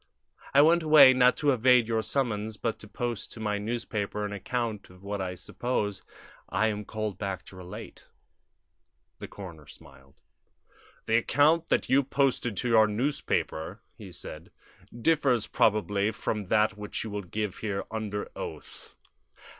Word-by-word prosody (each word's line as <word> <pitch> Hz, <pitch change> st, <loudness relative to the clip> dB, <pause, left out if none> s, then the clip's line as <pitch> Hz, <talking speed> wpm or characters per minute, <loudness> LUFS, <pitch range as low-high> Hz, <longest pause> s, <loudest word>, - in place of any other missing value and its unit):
"I 140 Hz, -, +8 dB
went 170 Hz, +2 st, +5 dB
away, 150 Hz, -4 st, +8 dB
not 125 Hz, 0 st, +4 dB
to 145 Hz, -1 st, +2 dB
evade 125 Hz, -1 st, +4 dB
your 115 Hz, -1 st, +1 dB
summons, 110 Hz, -3 st, -2 dB
but 115 Hz, -2 st, -2 dB
to 105 Hz, -, -11 dB
post 120 Hz, 0 st, -4 dB
to -, -, -10 dB
my 105 Hz, -1 st, -1 dB
newspaper 105 Hz, -2 st, -3 dB
an 105 Hz, -, -4 dB
account 115 Hz, +1 st, -3 dB
of 90 Hz, +1 st, -17 dB
what 100 Hz, 0 st, -3 dB
I 90 Hz, -1 st, -3 dB
suppose 105 Hz, -1 st, -3 dB, 0.5 s
I 110 Hz, -, +2 dB
am 105 Hz, -1 st, -4 dB
called 110 Hz, -3 st, -4 dB
back 95 Hz, -2 st, -4 dB
to -, -, -13 dB
relate." 90 Hz, -1 st, -10 dB, 1.1 s
The -, -, -7 dB
coroner 85 Hz, -7 st, -10 dB
smiled. 70 Hz, 0 st, -16 dB, 0.9 s
"The 115 Hz, -, +3 dB
account 150 Hz, +7 st, +3 dB
that -, -, +1 dB
you 135 Hz, +2 st, +4 dB
posted 135 Hz, -5 st, 0 dB
to 125 Hz, -, -1 dB
your 110 Hz, -2 st, +6 dB
newspaper," 105 Hz, -, -2 dB, 0.2 s
he 100 Hz, -5 st, -11 dB
said, 85 Hz, -2 st, -9 dB, 0.5 s
"differs 135 Hz, -7 st, +2 dB
probably 105 Hz, -1 st, +2 dB
from 105 Hz, -2 st, -3 dB
that 105 Hz, +1 st, +2 dB
which 105 Hz, 0 st, -5 dB
you 110 Hz, -, -6 dB
will 105 Hz, 0 st, -3 dB
give 100 Hz, +2 st, -4 dB
here 100 Hz, -3 st, -2 dB
under 105 Hz, -2 st, -3 dB
oath." -, -, -9 dB
110 Hz, 155 wpm, -28 LUFS, 100-125 Hz, 1.1 s, I